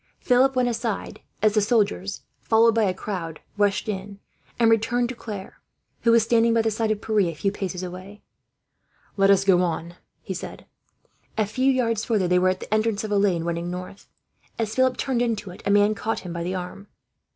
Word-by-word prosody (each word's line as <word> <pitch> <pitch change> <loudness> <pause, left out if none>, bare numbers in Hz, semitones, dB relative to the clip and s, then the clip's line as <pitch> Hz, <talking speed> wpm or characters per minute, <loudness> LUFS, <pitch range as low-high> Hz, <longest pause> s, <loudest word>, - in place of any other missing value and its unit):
Philip 260 +2 +3
went 250 -1 +2
aside 230 -2 -3 0.2
as 215 -1 +4
the 215 - +3
soldiers, 205 -3 0 0.2
followed 230 +1 +4
by 225 -1 +2
a 190 - +2
crowd, 180 -4 -5 0.2
rushed 205 0 +1
in; 200 -1 -5 0.4
and 230 -1 +4
returned 235 +2 +1
to 255 - -5
Claire, 205 -4 -8 0.4
who 230 - +3
was 230 -1 +5
standing 230 0 +3
by 225 - +3
the 225 - +1
side 220 +1 -1
of 215 -1 -1
Pierre, 220 -1 0
a 165 - -6
few 195 +5 -1
paces 185 -2 -4
away. 185 +3 -9 0.9
"Let 195 -1 +3
us 195 -1 +5
go 185 -2 +5
on," 170 -1 -2 0.3
he - - -4
said. - - -8 0.7
A 215 - +2
few 260 +6 +1
yards 230 -4 0
further 215 -7 +1
they 180 0 +3
were 185 +1 +3
at 185 0 -2
the - - -4
entrance 215 -1 +1
of 215 - -4
a 205 - +2
lane 185 -5 +2
running 170 0 -3
north. 185 +2 -8 0.5
As 220 -2 -2
Philip 260 0 +2
turned 260 -3 -1
into 225 -5 -2
it, 180 - -12
a - - +1
man 205 +1 +4
caught 220 +2 -3
him 180 -2 -7
by 170 - -4
the 180 +2 -2
arm. 185 +2 -7
205 Hz, 205 wpm, -24 LUFS, 185-230 Hz, 0.9 s, was